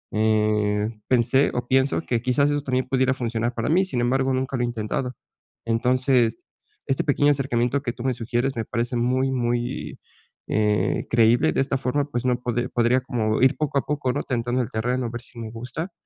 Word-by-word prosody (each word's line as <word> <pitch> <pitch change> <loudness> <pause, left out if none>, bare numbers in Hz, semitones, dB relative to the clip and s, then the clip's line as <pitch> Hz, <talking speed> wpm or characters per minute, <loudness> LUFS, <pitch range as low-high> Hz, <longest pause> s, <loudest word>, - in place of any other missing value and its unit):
eh, 105 -1 +2 0.2
pensé 130 +2 +3
o 125 0 -2
pienso 135 +4 +2
que, 120 -2 0
quizás, 140 +4 +2
eso 145 0 0
también 130 -2 -1
pudiera 130 0 +2
funcionar 120 -1 -2
para 115 -1 -2
mí. 180 +5 +4
Sin 130 -10 -2
embargo, 130 +2 +1
nunca 130 +1 -1
lo - - -1
he - - +2
intentado. 120 +2 -3 0.5
Entonces, 125 0 +1 0.4
este 135 - 0
pequeño 145 0 +3
acercamiento 135 -1 0
que 120 -4 -2
tú 120 - -8
me 130 -1 +1
sugieres 120 +3 -1
me 115 - -2
parece 120 +3 -2
muy, 130 +3 +1
muy, 120 -1 -2 0.5
eh, 105 -1 +1
creíble 115 0 +4
de - - +1
esta 135 0 0
forma, 135 +2 0
pues 120 -1 -2
no 125 -1 +2
pode 120 +1 -1
podría 120 +2 +2
como 110 -4 -1
ir 130 0 +4
poco 150 -2 -1
a - - -4
poco, 145 -4 -1
¿no?, - - -1
tentando 120 0 -1
el 120 - -3
terreno 125 +3 -1
a - - -4
ver 120 0 -6
si 120 -1 -13
me 115 -1 -5
gusta 130 - -6
125 Hz, 200 wpm, -24 LUFS, 115-130 Hz, 0.5 s, mí